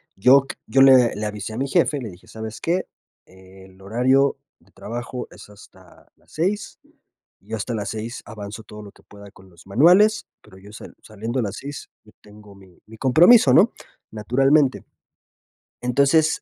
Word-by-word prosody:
Yo 130 +7 +5
c - - -6
yo 135 - +2
le 130 -3 +5
le 105 - -5
avisé 105 +1 -6
a - - -7
mi 135 +2 -2
jefe, 150 -1 +1
le 120 -4 -7
dije: 90 -1 -16
"¿Sabes 110 0 -9
qué? 180 +3 -1 0.4
El 95 0 -18
horario 130 +7 +1 0.2
de - - -29
trabajo 120 +2 -7
es - - -15
hasta 95 -3 -19
las - - -29
6. 195 +5 -3 0.6
Yo 110 +3 -7
hasta 115 +3 -5
las 105 -3 -4
6 110 +2 -6
avanzo 105 0 -9
todo 105 0 -12
lo 100 -1 -12
que - - -24
pueda 100 -1 -15
con 95 -1 -19
los 85 -2 -20
manuales, 180 - +4 0.2
pero 95 - -18
yo 100 +2 -15
sal - - -12
saliendo 110 +4 -5
a - - +1
las 100 -1 -5
6, 140 +1 -9
yo 110 - -20
tengo 105 -1 -17
mi 95 -2 -20
mi 110 +1 -14
compromiso, 175 - +5
¿no?, 205 +8 +5 0.4
naturalmente". 135 +6 +1 1.0
Entonces, 140 +6 +1
115 Hz, 175 wpm, -21 LUFS, 100-135 Hz, 1.0 s, Yo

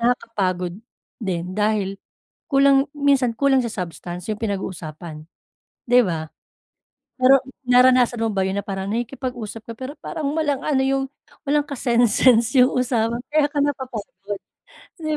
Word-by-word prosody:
nakakapagod 195 -7 -1 0.4
din 180 -4 -3
dahil 205 -1 0 0.5
kulang 275 0 +4
minsan 275 -5 +2
kulang 275 0 +3
sa 235 - -1
substance 175 0 -6
yung 210 - -3
pinag-uusapan, 170 -7 -5 0.6
'di 245 +1 +6
ba? 160 -3 -3 0.9
Pero 260 +2 +7 0.3
naranasan 250 -1 +5
mo 225 - +1
ba 195 - 0
yun 190 +1 -1
na 200 - -6
parang 195 -1 -4
nakikipag-usap 240 -2 -4
ka - - -6
pero 260 +3 -6
parang 315 -4 -4
walang 290 -4 0
ano 275 -3 +2
yung 270 0 +1 0.4
walang 295 +1 +3
ka-sense-sense 240 -1 +3
yung 255 +2 +6
usapan 235 -2 0
kaya 305 -1 +4
ka 290 - -1
napapagod, 230 -7 -4 0.6
'di 310 -1 -1
235 Hz, 135 wpm, -22 LUFS, 195-270 Hz, 0.9 s, Pero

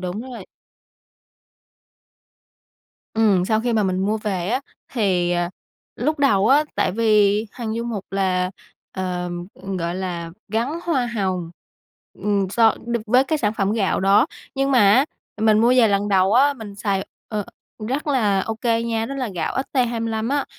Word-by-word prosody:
đúng 185 +5 -4
rồi. 240 -7 -9 2.7
Ừm, 205 -5 +3
sau 220 +2 +1
khi 240 0 -1
mà 220 - +2
mình 185 -1 0
mua 215 +1 0
về 195 -4 -2
á 255 +4 0 0.3
thì, 185 -7 +1
à, 175 0 0 0.5
lúc 300 +5 -1
đầu 210 -7 +3
á, 290 +3 +5
tại - - +1
vì 215 -1 +3
Hằng 225 -3 -4
Du 230 +1 -3
Mục 215 -5 -4
là, 185 -2 0 0.4
ờ, 180 -1 -3 0.2
ừm, 195 0 -6
gọi 170 0 -2
là, 175 -3 -4 0.2
gắn 265 +10 -1
hoa 270 -8 +1
hồng. 185 -7 -2 0.7
Ừm, 200 -2 +1
so 225 +1 +4
đ 235 - 0
với 250 +4 +4
cái 310 +2 -1
sản 210 -4 0
phẩm 200 0 0
gạo 205 -4 0
đó, 200 +7 +4 0.3
nhưng 275 0 0
mà 255 -4 +5
á, 260 +5 +5 0.4
mình 215 -1 +4
mua 235 +2 +4
về 230 -3 +6
lần 200 +1 +1
đầu 190 0 +3
á, 275 +5 +5
mình 220 -5 -9
xài, 200 -1 -2 0.2
ờ, 210 -3 -3 0.4
rất 280 +4 -2
là 215 -9 +2
OK 225 +4 -5 0.2
nha, 225 -1 -1
đó 275 - -5
là 260 -3 -2
gạo 170 - -2 0.2
ST25 230 -3 0
á, 285 +1 0
215 Hz, 170 wpm, -22 LUFS, 190-240 Hz, 2.7 s, về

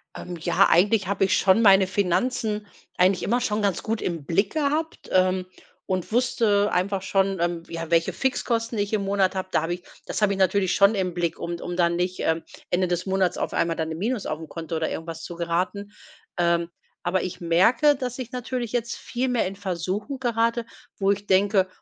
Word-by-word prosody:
Ähm, 175 -1 -7
ja 160 - +3
eigentlich 195 +3 +3
habe 195 0 +1
ich 190 0 +2
schon 190 +3 +4
meine 195 -3 +6
Finanzen 210 +3 0 0.3
eigentlich 185 0 +3
immer 245 +3 +1
schon 215 -3 0
ganz 200 -4 0
gut 225 0 -2
im 165 -5 -3
Blick 195 +6 +1
gehabt, 310 +2 -1
ähm, 185 0 +2 0.4
und 185 0 -2
wusste 220 -4 +2
einfach 190 +2 0
schon, 195 0 +1
ähm, 170 0 -1
ja 165 0 -6
welche 165 0 +2
Fixkosten 230 -3 -1
ich 205 +1 -1
im 205 -2 +1
Monat 195 -1 +1
habe 185 0 -3
da - - +2
habe 170 +2 -2
ich 175 - -15 0.2
das - - -3
habe 205 -1 +3
ich 195 - -5
natürlich 190 0 +2
schon 200 +2 +5
im 185 -3 -1
Blick 170 -1 -1
um 170 0 -4
d - - -10
um 175 - -4
dann 170 -1 +2
nicht, 180 +1 -2
ähm, 160 0 0 0.3
Ende 180 +1 +2
des 175 0 -1
Monats 190 -2 +1
auf - - -3
einmal 165 0 +1
dann 160 0 -3
im 160 - -4
Minus 230 +2 -1
aufm 155 +1 -4
Konto 165 0 -6
oder 160 0 -1
irgendwas 165 0 -6
zu 175 - -7
geraten. 180 +4 -2 0.5
Ähm, 170 -1 +1 0.3
aber 180 +1 +1
ich 180 0 -5
merke, 190 - +4
dass 255 -2 -4
ich 255 -1 -6
natürlich 245 -2 -4
jetzt 235 -1 -2
viel 250 +2 -3
mehr 245 -2 +1
in 190 - -6
Versuchung 195 - -3
gerate, 230 -1 0 0.3
wo 195 0 +2
ich 200 +1 -3
denke: 195 0 +3
190 Hz, 205 wpm, -24 LUFS, 175-220 Hz, 0.5 s, meine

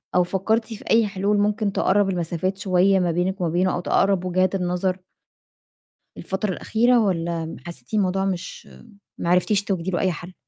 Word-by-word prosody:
أو 180 - +5
فكّرتِ 210 +5 0
في 210 - -10
أي 225 -1 +4
حلول 200 +1 0
ممكن 205 0 +1
تقرّب 200 +1 +2
المسافات 180 +1 -2
شوية 190 0 +3
ما 175 -2 +1
بينك 185 +3 -1
وما 175 - +1
بينه، 180 +3 +1
أو - - -1
تقرّب 190 +1 +1
وجهات 185 +1 +1
النظر؟ 180 0 -1 1.2
الفترة 190 +1 -2
الأخيرة 240 +6 +2
والّا 170 -5 -1
م 160 - -7
حسّيتِ 150 - -10
الموضوع 195 -2 +1
مش 185 -1 -5 0.5
ما 170 - -3
عرفتيش 195 +3 +2
توجدي 190 -2 -2
له 175 - -1
أي 185 -2 +1
حَل؟ 175 +3 -8
185 Hz, 170 wpm, -23 LUFS, 175-200 Hz, 1.2 s, أو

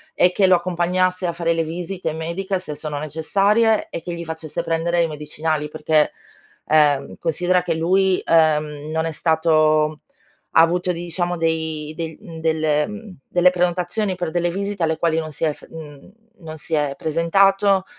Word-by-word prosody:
e 180 - +4
che 195 - +3
lo 185 - +5
accompagnasse 180 +1 0
a 175 - 0
fare 170 0 0
le 165 0 0
visite 175 +2 -4
mediche, 175 +4 -3
se 155 -5 -7
sono 150 -1 -5
necessarie 200 +9 +1
e - - -5
che 175 - -6
gli 170 0 -5
facesse 160 -1 -5
prendere 165 +1 0
i 165 - +2
medicinali. 150 0 -3
Perché, 155 0 +1 0.6
ehm, 145 -3 +3
considera 180 +2 +1
che 175 - -1
lui, 185 +3 +2
uhm, 155 -2 +2
non 160 0 0
è 165 - -2
stato 155 -1 +2 0.5
ha - - +8
avuto, 175 +2 +2
diciamo, 175 +1 -2
dei 160 -2 -2
del 165 -2 -5
mhmm, 165 -2 -10
del 155 -2 +1
mhmm, 210 -2 -9
delle 180 0 +4
prenotazioni 180 +3 0
per 175 -2 -3
delle 175 0 0
visite 200 0 -3
alle 160 0 +1
quali 160 -1 +1
non 155 -1 -5
si 155 - -2
è 155 - +2
f - - -16
mhmm, 155 +1 -11 0.3
non 160 -1 -8
si 160 - -3
è 145 -2 0
presentato, 195 +4 +2
165 Hz, 175 wpm, -21 LUFS, 155-180 Hz, 0.6 s, ha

